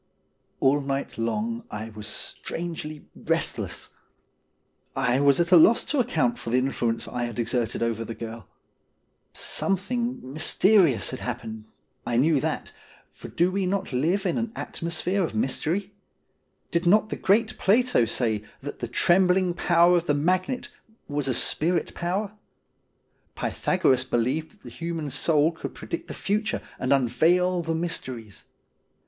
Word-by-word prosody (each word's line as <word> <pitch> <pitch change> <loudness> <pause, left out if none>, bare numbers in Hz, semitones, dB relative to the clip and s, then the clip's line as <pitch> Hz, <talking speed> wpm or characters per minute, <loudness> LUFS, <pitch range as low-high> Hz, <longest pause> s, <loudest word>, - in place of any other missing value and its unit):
All 140 +2 +3
night 135 -3 -3
long 115 0 -2
I 110 +1 -6
was 105 0 -8
strangely 160 -3 -5
restless. - - -2 1.0
I 125 +2 +2
was 140 +1 +4
at 170 +1 +1
a 180 - +9
loss 220 +8 +6
to 295 - -1
account 150 - +1
for - - -5
the 125 - +2
influence 120 -3 0
I 120 -1 -2
had 120 -2 -6
exerted 120 -1 -1
over 115 -1 -1
the 115 0 -6
girl. 115 -3 -8 0.8
Some 195 -1 0
thing 235 - -4
mysterious 170 - +3
had 130 - -5
happened 110 -3 -5 0.2
— - - -44
I - - +2
knew 150 +3 +4
that, - - -3 0.4
for - - -10
do 175 +2 +1
we 190 -1 0
not 190 -5 -2
live 170 +10 +1
in 180 +5 +1
an 230 -1 -2
atmosphere 175 +3 -2
of 160 - -3
mystery? 170 - -1 0.8
Did 170 +1 0
not 215 +4 +4
the - - -2
great 220 +3 +1
Plato 230 - +3
say 110 -2 0 0.2
that 145 +1 -7
the 120 - -3
trembling 180 +7 +3
power 175 +1 +4
of 170 - -2
the 145 - +3
magnet 185 - 0 0.4
was 145 -2 -2
a 130 - +1
spirit 170 +3 +1
power? 190 +4 -2 1.0
Pythagoras 130 -1 +1
believed 130 +6 -1
that 210 -1 -26
the - - -9
human 165 -3 -4
soul 150 +3 +2
could 165 - -7
predict 170 - -6
the - - -7
future 210 +2 -1 0.2
and 130 - -1
unveil 175 +8 +3
the 165 -1 -2
mysteries. 130 - -4
160 Hz, 150 wpm, -26 LUFS, 125-185 Hz, 1.0 s, a